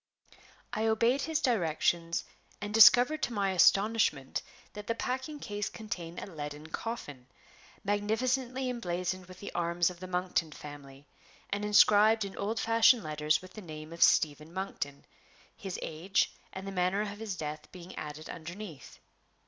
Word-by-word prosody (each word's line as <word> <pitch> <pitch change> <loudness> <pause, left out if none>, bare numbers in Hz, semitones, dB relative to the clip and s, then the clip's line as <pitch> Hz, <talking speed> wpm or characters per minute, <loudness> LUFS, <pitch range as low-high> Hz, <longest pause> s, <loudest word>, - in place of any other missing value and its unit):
I 220 +1 0
obeyed 230 +5 +3
his 320 0 0
directions, 170 - +1 0.3
and 205 +1 -5
discovered 245 +7 +7
to 240 - -1
my 200 -3 +1
astonishment 195 -7 +3 0.3
that 210 0 -8
the 230 - 0
packing 260 +6 -3
case 205 -3 -3
contained 175 -6 -6
a - - -6
leaden 150 -3 -7
coffin, 145 - -6 0.6
magnificently 245 +6 0
emblazoned 185 -6 -3
with 185 0 -12
the 200 - -7
arms 170 +1 +1
of 175 - -13
the 185 - -7
Monkton 180 -3 -1
family, 145 -2 -11 0.5
and 200 +1 -1
inscribed 210 +1 +5
in 195 - -8
old 215 +3 -2
fashioned 230 0 +5
letters 150 +1 0
with 185 - -12
the 215 - -8
name 155 -2 -9
of 170 - -10
"Stephen 155 0 +4
Monkton," 170 -7 -5 0.5
his 195 -5 -6
age 170 +5 0 0.2
and 190 0 -7
the 195 - -4
manner 185 +2 +1
of 205 -1 -5
his 220 -4 -4
death 150 -2 -6
being 180 0 -10
added 150 +1 -7
underneath. 170 - -8
190 Hz, 150 wpm, -31 LUFS, 160-220 Hz, 0.6 s, discovered